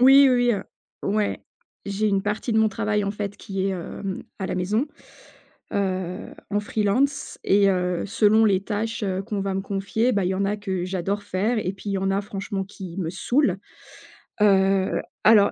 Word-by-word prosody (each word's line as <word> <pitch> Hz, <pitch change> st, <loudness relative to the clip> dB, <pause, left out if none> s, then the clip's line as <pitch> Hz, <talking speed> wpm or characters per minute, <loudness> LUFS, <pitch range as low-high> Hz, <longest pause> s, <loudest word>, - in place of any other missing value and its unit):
Oui, 270 Hz, +2 st, +8 dB
oui, 245 Hz, -1 st, +3 dB
heu, 205 Hz, -, -2 dB, 0.4 s
ouais, 210 Hz, +1 st, 0 dB, 0.4 s
j'ai 205 Hz, +2 st, 0 dB
une 195 Hz, -1 st, +1 dB
partie 210 Hz, +3 st, -2 dB
de 220 Hz, -, +3 dB
mon 220 Hz, -, +4 dB
travail, 210 Hz, 0 st, 0 dB
en 200 Hz, -, 0 dB
fait, 205 Hz, -1 st, -4 dB
qui 195 Hz, -2 st, -3 dB
est, -, -, +1 dB
hem, 190 Hz, +1 st, -5 dB, 0.2 s
à 190 Hz, -, -1 dB
la -, -, -2 dB
maison, 210 Hz, +9 st, +1 dB, 0.9 s
heu, 185 Hz, -2 st, -2 dB, 0.2 s
en 205 Hz, -, +1 dB
free-lance 230 Hz, +8 st, 0 dB
et 200 Hz, 0 st, +5 dB
heu, 180 Hz, -2 st, 0 dB
selon 220 Hz, +1 st, +4 dB
les 195 Hz, -3 st, +3 dB
tâches, 220 Hz, +2 st, -3 dB
heu, 190 Hz, -1 st, -1 dB
qu'on 210 Hz, -1 st, -3 dB
va 195 Hz, 0 st, -1 dB
me 195 Hz, -, 0 dB
confier, 200 Hz, +5 st, 0 dB
bah 200 Hz, -4 st, +1 dB
il -, -, +1 dB
y -, -, 0 dB
en 195 Hz, +1 st, 0 dB
a 205 Hz, +1 st, 0 dB
que 190 Hz, -3 st, -3 dB
j'adore 195 Hz, +2 st, -2 dB
faire 210 Hz, +5 st, 0 dB
et 185 Hz, -3 st, -1 dB
puis 200 Hz, +1 st, -7 dB
il -, -, -1 dB
y -, -, +1 dB
en 195 Hz, 0 st, 0 dB
a 195 Hz, -, +1 dB
franchement 195 Hz, -1 st, -4 dB
qui 190 Hz, -3 st, -9 dB
me 165 Hz, -3 st, -1 dB
saoulent. 195 Hz, -, +1 dB, 0.8 s
Heu, 195 Hz, -1 st, +3 dB, 0.2 s
alors 210 Hz, -1 st, +6 dB
200 Hz, 195 wpm, -24 LUFS, 190-215 Hz, 0.9 s, Oui